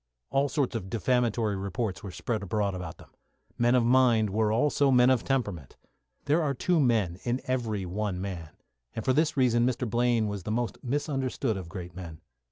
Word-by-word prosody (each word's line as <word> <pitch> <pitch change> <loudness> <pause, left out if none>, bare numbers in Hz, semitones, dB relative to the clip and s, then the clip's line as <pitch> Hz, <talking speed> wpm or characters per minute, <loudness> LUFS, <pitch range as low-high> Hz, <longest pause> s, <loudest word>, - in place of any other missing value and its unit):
All 140 +1 +2
sorts 140 -5 -1
of 95 -4 -4
defamatory 115 0 +1
reports 100 +1 -3
were 100 - -7
spread 110 +4 -3
abroad 100 0 -1
about 90 -3 -6
them. - - -17 0.5
Men 120 +1 +4
of 120 -2 +3
mind 120 -4 +4
are 105 +1 +1
also 140 +4 +2
men 125 0 +5
of 130 -3 +2
temperament. 100 - -2 0.5
There 155 +4 +3
are 140 -3 0
two 175 +6 +1
men 110 - +1
in 120 +1 0
every 115 -6 -1
one 95 +1 -3
man, 90 -5 -5 0.5
and 110 - -4
for 130 - +3
this 155 +1 +1
reason 120 -3 +3
Mr. 125 0 0
Blaine 120 0 +2
was 100 -1 -4
the 105 - -6
most 120 +2 -2
misunderstood 135 -3 -1
of 95 -3 -6
great 90 -2 -8
men. 85 -4 -8
115 Hz, 185 wpm, -28 LUFS, 100-130 Hz, 0.5 s, men